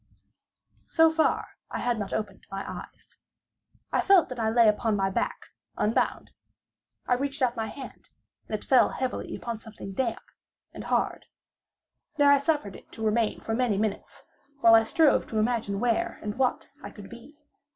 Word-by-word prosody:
So 325 -1 +4
far, 320 0 +1 0.2
I - - -4
had 240 -2 -1
not 200 -2 -4
opened 205 -3 -4
my 195 0 -5
eyes. - - -10 0.7
I - - +2
felt 390 -4 +5
that 255 -2 -6
I 220 -1 +1
lay 230 0 +5
upon 215 +1 +2
my 195 -1 0
back, - - -3 0.3
unbound. 215 +2 0 0.7
I - - +2
reached 275 +2 -1
out 245 -1 +2
my 225 -1 -2
hand, 265 +4 -10 0.4
and 215 - -2
it - - -13
fell 260 - +5
heavily 260 -1 -4
upon 235 -2 -5
something 210 -3 -9
damp 235 +1 -2 0.5
and - - -8
hard. - - -1 0.9
There 285 -1 +6
I 285 - +6
suffered 280 - -1
it - - -15
to 220 - -5
remain 220 0 +1
for 225 - -3
many 230 -4 +1
minutes, 210 -1 -3 0.4
while 230 - +7
I 225 - +8
strove 310 +6 +3
to 220 - -4
imagine 215 -3 0
where 235 -1 0
and 210 0 -4
what 255 -1 -1
I - - -7
could 205 -2 -12
be. 235 +6 -13
230 Hz, 170 wpm, -27 LUFS, 215-260 Hz, 0.9 s, I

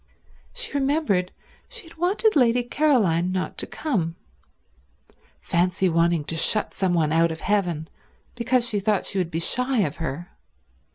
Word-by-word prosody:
She - - -3
remembered 275 - 0 0.4
she 485 -3 -9
had 330 -1 -16
wanted 390 +6 +1
Lady 245 -3 +3
Caroline 225 - +2
not 185 0 -3
to - - -3
come; 180 - -2 1.3
fancy 180 +2 +1
wanting 170 -1 +2
to 165 - -4
shut 210 +6 +2
some 185 -2 0
one 155 -3 +1
out 165 +1 +3
of 160 - -7
heaven 180 -6 -1 0.5
because 245 0 0
she 210 -3 -1
thought 205 0 0
she 195 - -2
would 180 -3 -1
be 165 - -3
shy 250 +7 +1
of 155 -5 -2
her! 165 +2 -5
195 Hz, 155 wpm, -24 LUFS, 170-255 Hz, 1.3 s, Lady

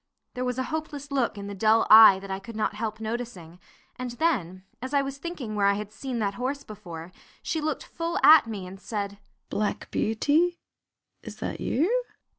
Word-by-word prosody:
There 250 - -3
was 250 0 -2
a 260 - 0
hopeless 290 -3 -5
look 260 -6 0
in 200 - -6
the 200 - -6
dull 220 +3 +3
eye 215 -3 +10
that 195 0 -8
I 190 - -2
could 230 +3 -10
not 215 -1 0
help 215 0 -4
noticing, 220 -7 -6 0.4
and 255 -1 -4
then, 235 - -1 0.2
as 260 +3 -3
I 280 - +4
was 275 0 -6
thinking 285 -9 -5
where 205 -1 +2
I 200 - +3
had 210 0 -5
seen 250 +2 -5
that 205 -3 0
horse 275 +3 -2
before, 175 -7 -9 0.3
she 320 - -2
looked 305 -1 -2
full 335 0 -4
at 310 -6 +8
me 205 -5 -5
and 190 +1 -10
said, 200 -2 -4 0.3
"Black 210 0 -2
Beauty, 305 +11 +1 0.6
is - - -9
that - - -5
you?" 430 - +1
225 Hz, 195 wpm, -26 LUFS, 200-280 Hz, 0.6 s, eye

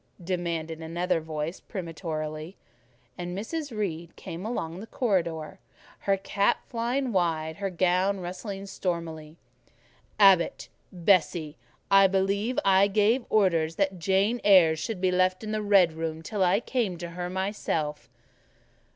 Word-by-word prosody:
demanded 170 -3 -3
another 170 +1 -1
voice 155 +2 -4
peremptorily; 160 -2 -5 0.6
and 175 +1 -4
Mrs. 295 +8 -4
Reed 175 -7 -4
came 180 +3 -7
along 170 -7 -4
the 220 - -8
corridor, 170 - -1 0.4
her 195 -1 +1
cap 200 +1 0
flying 245 +3 -1
wide, 160 -4 0
her 200 -1 -2
gown 185 +2 +1
rustling 195 +2 -6
stormily. 165 -5 -4 0.8
"Abbot 195 -4 +4 0.2
and 175 -3 -11
Bessie, 165 -5 +3 0.4
I 195 0 +7
believe 200 +5 0
I 195 +1 +5
gave 215 +5 +2
orders 165 -6 +2
that 190 -1 0
Jane 195 +7 +1
Eyre 180 -6 +6
should 190 +4 -4
be 185 -1 +2
left 185 +2 +1
in 215 - -4
the 215 0 -1
red 195 -5 +4
room 160 0 -4
till 200 +3 -1
I 185 +4 +3
came 230 -9 -1
to 170 0 -7
her 175 +1 -4
myself." 165 - -2
185 Hz, 135 wpm, -27 LUFS, 165-200 Hz, 0.8 s, I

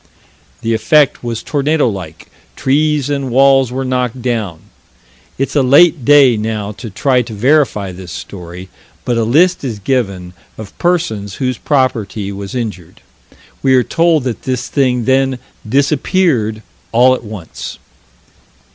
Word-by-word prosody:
The 115 0 -1
effect 145 +6 +2
was 115 -2 -4
tornado 150 0 +1
like: 90 -7 -7 0.3
trees 145 +1 +1
and 140 -2 -2
walls 135 0 +4
were 130 +1 -3
knocked 125 -1 -1
down. 110 -9 -3 0.8
It's 135 +2 -2
a 145 - +4
late 145 +3 +5
day 140 -3 +5
now 105 -1 -3
to 115 +2 -9
try 125 +5 +1
to 115 -2 -7
verify 125 -5 +1
this 90 -1 -10
story, 90 +1 -9 0.4
but 120 - 0
a - - +1
list 160 +11 +3
is 120 -6 -3
given 100 -6 -2 0.2
of 110 -3 -10
persons 110 - -1
whose 130 -2 -2
property 115 -8 -1
was 100 +3 -7
injured. 105 -9 -6 0.6
We 135 -1 +3
are 125 - +4
told 165 -2 +2
that 125 -3 -4
this 125 -2 -3
thing 125 -4 +1
then 135 0 +2 0.3
disappeared 140 - +1 0.3
"all 125 +3 +5
at 130 - -4
once." 105 -7 -8
125 Hz, 140 wpm, -15 LUFS, 105-140 Hz, 0.8 s, late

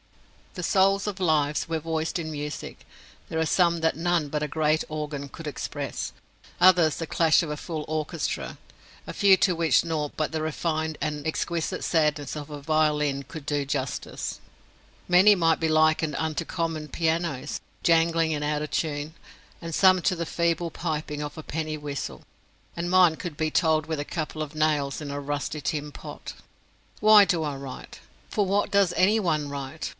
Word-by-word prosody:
If - - -30
the 180 - -5
souls 195 +3 +3
of 200 -2 -4
lives 150 -3 +1
were 165 -1 0
voiced 160 +1 -2
in 160 -1 -4
music, 150 0 -6 0.4
there 160 - -2
are 160 - +2
some 170 0 +3
that 160 - +2
none 170 -2 +1
but 150 +1 -2
a 150 - -2
great 155 0 +1
organ 150 -2 -4
could 165 +3 -9
express, 145 - -4 0.5
others 175 -4 +5
the 165 - -4
clash 165 +1 +4
of 165 - -4
a 150 - -2
full 155 0 -5
orchestra, 155 -1 -3 0.5
a - - -5
few 195 -2 +5
to 180 -1 +2
which 165 0 +3
nought 155 -3 -3
but 155 - -1
the 160 - -1
refined 155 0 -2
and 150 0 -3
exquisite 170 +3 -2
sadness 150 -4 +1
of 150 -1 -7
a 145 -1 -6
violin 150 -2 +1
could 150 0 -9
do 145 -1 0
justice. 135 -2 -4 0.7
Many 185 +4 +7
might 165 -3 +2
be 160 - +1
likened 155 -1 +3
unto 160 +2 -1
common 165 -3 -3
pianos, 160 -4 -1 0.2
jangling 165 -1 +3
and 150 -1 -2
out 150 0 -1
of 150 - -6
tune, 150 -1 -2 0.5
and 165 -1 -6
some 185 +1 +5
to 185 - +1
the 170 - -2
feeble 170 0 0
piping 150 -3 -3
of 150 +1 -6
a 155 - -7
penny 155 0 -3
whistle, 140 - -5 0.5
and 170 +1 -3
mine 180 -3 +5
could 165 -3 -7
be 155 -1 0
told 160 -3 +2
with 160 -2 -3
a - - -1
couple 155 0 -4
of 155 0 -5
nails 150 -3 +1
in 145 -2 -6
a 140 - -3
rusty 145 +1 -3
tin 150 +1 -3
pot. - - -8 0.7
Why 215 -1 +8
do 175 -5 +1
I 145 -2 -2
write? 135 -1 -9 0.3
For 205 - +1
what 200 +2 +1
does 200 -3 +3
any 210 +4 +4
one 155 -7 0
write? 140 +2 -5
155 Hz, 180 wpm, -26 LUFS, 150-170 Hz, 0.7 s, Why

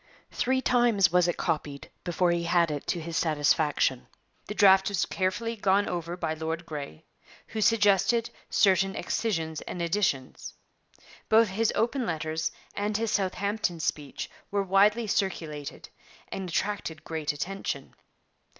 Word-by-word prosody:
Three 260 +1 +1
times 240 -8 +3
was 180 0 +4
it 175 - -1
copied 145 -3 -3
before 175 0 +1
he 170 0 0
had 170 -2 +3
it 145 -1 -5
to 175 - 0
his 165 0 -6
satisfaction. 150 -4 +1 0.4
The 210 - -5
draft 195 -2 +6
was 195 -2 0
carefully 205 +5 -1
gone 200 -1 +2
over 175 0 -3
by 165 -3 -2
Lord 160 +1 -4
Grey, 145 - -7 0.4
who 220 - -3
suggested 210 +1 +3 0.2
certain 195 -1 +3
excisions 165 -8 -2
and 180 - -6
additions. 170 -7 -1 0.7
Both 220 -1 +5
of 190 - -8
his 225 +1 +2
open 240 +2 0
letters 160 -1 -2 0.2
and 205 +1 -1
his 225 -1 -1
Southampton 195 -1 -1
speech 150 -2 -3 0.2
were 200 0 0
widely 205 +4 +3
circulated, 160 -8 -3 0.4
and 190 -2 -5
attracted 165 -4 -2
great 160 -2 -2
attention. 195 +7 -4
185 Hz, 140 wpm, -28 LUFS, 160-205 Hz, 0.7 s, draft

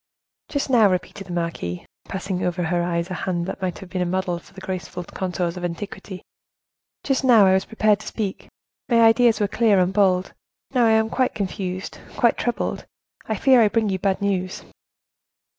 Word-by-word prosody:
"Just 285 -2 -1
now," 225 -5 +6
repeated 185 +2 -3
the 175 - -6
marquise, 165 - -3 0.2
passing 190 -1 -4
over 180 0 -1
her 175 +1 0
eyes 170 +1 -2
a - - -1
hand 180 -2 -2
that 190 +1 -6
might 185 -2 -2
have 190 - -11
been 185 - -2
a - - +1
model 185 -1 -1
for - - -20
the 195 - -12
graceful 185 -2 -5
contours 180 -1 -3
of 180 - -6
antiquity; 185 +2 -6 0.8
"just 270 -1 0
now 235 -6 +6
I 190 - +5
was 190 0 +2
prepared 215 -2 +2
to - - -11
speak, 205 -4 -4 0.4
my 235 -2 +4
ideas 230 0 +5
were 205 - +2
clear 210 -1 +3
and 180 +1 +1
bold; 190 -2 +2 0.4
now 245 -3 +4
I - - +4
am 220 +1 +2
quite 255 -1 0
confused, 190 -2 -4 0.2
quite 235 - +4
troubled; 240 - -2 0.4
I 220 - -1
fear 255 +3 +5
I 220 - +6
bring 220 0 +1
you 190 -1 -1
bad 195 +1 0
news." 185 -2 -1
190 Hz, 195 wpm, -23 LUFS, 180-220 Hz, 0.8 s, now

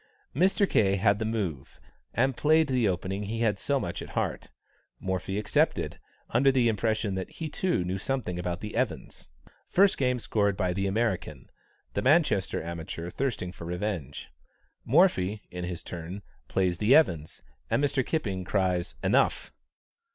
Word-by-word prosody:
Mr. 195 +5 +3
K. 100 - +3
had 100 +1 +2
the 110 - -1
move, 95 - -3 0.3
and 130 +2 +1
played 155 +4 +4
the 130 -5 +1
opening 95 +2 -2
he 110 +3 -3
has 105 -4 +1
so 140 -1 +1
much - - -4
at - - -8
heart; - - -2 0.5
Morphy 95 +1 -2
accepted, 105 - 0 0.3
under 135 +4 +4
the 125 -3 +3
impression 110 -1 0
that 95 -1 -4
he, 160 - -6
too, 175 - 0
knew 95 +2 -2
something 110 -7 -2
about 90 0 -3
the 105 - -6
Evans'. 120 - -3 0.4
First 195 +1 +4
game 125 -2 +2
scored 100 -4 0
by 90 -3 0
the 95 +2 -1
American, 95 - -2 0.4
the - - 0
Manchester - - +2
amateur 85 +1 -6
thirsting 120 -9 -2
for 85 - -10
revenge. 90 -5 -4 0.6
Morphy, 110 - +3
in 90 0 -4
his 90 -1 -5
turn, 90 +3 -7 0.2
plays 90 -3 0
the 110 +6 +5
Evans', 85 - +2 0.3
and - - +1
Mr. 140 -2 +2
Kipping 100 - -2
cries 90 -5 0
"enough." - - +2
100 Hz, 155 wpm, -28 LUFS, 90-125 Hz, 0.6 s, the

